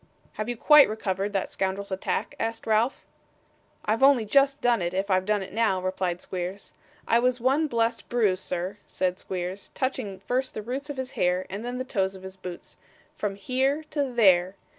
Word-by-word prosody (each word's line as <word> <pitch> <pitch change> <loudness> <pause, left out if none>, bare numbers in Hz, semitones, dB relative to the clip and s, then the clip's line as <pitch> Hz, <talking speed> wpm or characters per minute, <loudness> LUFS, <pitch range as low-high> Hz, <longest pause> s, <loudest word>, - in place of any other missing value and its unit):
'Have 215 +2 -4
you 240 - -3
quite 300 +1 +7
recovered 200 -2 -2
that 195 -2 -2
scoundrel's 195 +1 -2
attack?' 190 - -2
asked 225 0 -3
Ralph. 225 +4 +1 0.8
'I've 220 +3 +1
only 270 -4 +6
just 275 +5 +3
done 240 -4 +2
it, 175 +1 -2
if 195 +1 -1
I've 185 +1 +2
done 210 -2 +1
it 190 - -10
now,' 220 -4 +2
replied 185 -1 -2
Squeers. 185 +2 -5 0.3
'I 230 - +4
was 250 +1 +1
one 275 +6 +2
blessed 230 -2 -1
bruise, 210 -6 +2
sir,' 180 +3 -3
said 185 -1 -1
Squeers, 185 +1 -5
touching 250 -7 -2
first 255 +6 -2
the 215 - -4
roots 265 +6 -4
of 285 - -5
his 260 -1 -4
hair, 180 +1 +1
and 200 +3 -5
then 245 +1 -4
the 255 - -3
toes 195 -6 -1
of 190 - -12
his 190 0 -8
boots, 180 -2 -9 0.4
'from 205 -2 -2
HERE 265 +8 0
to 285 -3 -1
THERE. 190 -5 +4
210 Hz, 190 wpm, -26 LUFS, 190-250 Hz, 0.8 s, quite